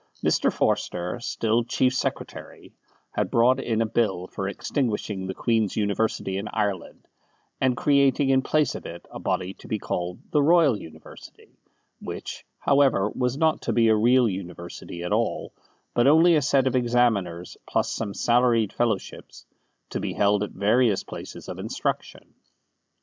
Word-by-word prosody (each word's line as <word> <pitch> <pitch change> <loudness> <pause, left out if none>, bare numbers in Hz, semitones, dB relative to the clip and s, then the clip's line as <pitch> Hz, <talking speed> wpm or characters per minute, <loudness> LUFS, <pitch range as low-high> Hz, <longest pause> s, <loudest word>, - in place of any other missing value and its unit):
Mr. - - +2
Forster, 90 +5 -1
still 115 0 0
Chief 125 +2 +1
Secretary, 130 - -5 0.4
had - - -1
brought 125 +3 +3
in 115 -3 0
a - - -1
Bill 105 -5 0
for 95 +1 -5
extinguishing 105 -3 -2
the 95 - -4
Queen's 110 -4 0
University 100 -2 -1
in 105 - -5
Ireland, 105 -4 -3 0.5
and 130 -1 +1
creating 140 -1 +3
in 135 0 +4
place 150 +2 +1
of - - -7
it 85 +1 -9
a - - -7
body 90 +1 -2
to - - -15
be 110 - -1
called 90 -3 -4
the 150 - +3
Royal 160 -4 +5
University, 80 -6 -13 0.4
which, - - -7
however, 135 -8 +3
was 125 +1 -1
not 160 0 +2
to - - -2
be 115 -1 +4
a 110 - +5
real 120 +3 +4
university 85 -2 -7
at 90 - -2
all, - - -1 0.4
but 120 +2 +3
only 165 +4 +6
a 150 - +3
set 140 -2 +2
of 130 - +1
examiners 115 -8 +1
plus - - 0
some 100 -3 -4
salaried 120 -3 +2
fellowships, 115 -5 -3 0.5
to - - -2
be - - -3
held 105 0 +2
at 105 - -2
various 110 0 +2
places - - -9
of - - -7
instruction. - - -4
115 Hz, 155 wpm, -25 LUFS, 100-130 Hz, 0.5 s, only